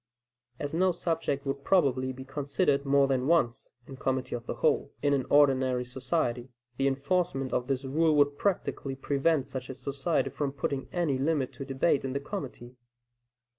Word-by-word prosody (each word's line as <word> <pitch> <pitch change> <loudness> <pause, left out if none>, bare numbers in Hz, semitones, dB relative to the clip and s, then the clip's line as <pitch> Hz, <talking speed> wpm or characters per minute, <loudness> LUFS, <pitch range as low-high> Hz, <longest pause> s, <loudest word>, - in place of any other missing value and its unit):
As 145 +2 -4
no 185 +3 +3
subject 160 -5 -2
would 140 0 -3
probably 135 -8 +2
be 130 +1 -9
considered 140 +1 0
more 140 0 +4
than 130 -1 0
once 150 -9 +1
in 135 - -10
committee 130 0 -2
of 120 -1 -5
the - - -3
whole, - - +1
in 145 -1 +3
an 135 -3 0
ordinary 130 -3 +4
society, 125 -1 -2 0.3
the 135 - +2
enforcement 135 0 0
of 125 - 0
this 135 0 -1
rule 155 +3 +2
would 145 -1 +4
practically 145 -6 -1
prevent 140 +1 0
such 130 -1 -5
a 130 - -5
society 135 +2 -1
from 140 0 -2
putting 140 -1 -3
any 165 -7 0
limit 140 -2 0
to 135 - -7
debate 135 +2 +1
in 135 -1 -3
the 140 - -1
committee. 135 -7 -7
135 Hz, 170 wpm, -29 LUFS, 130-145 Hz, 0.3 s, more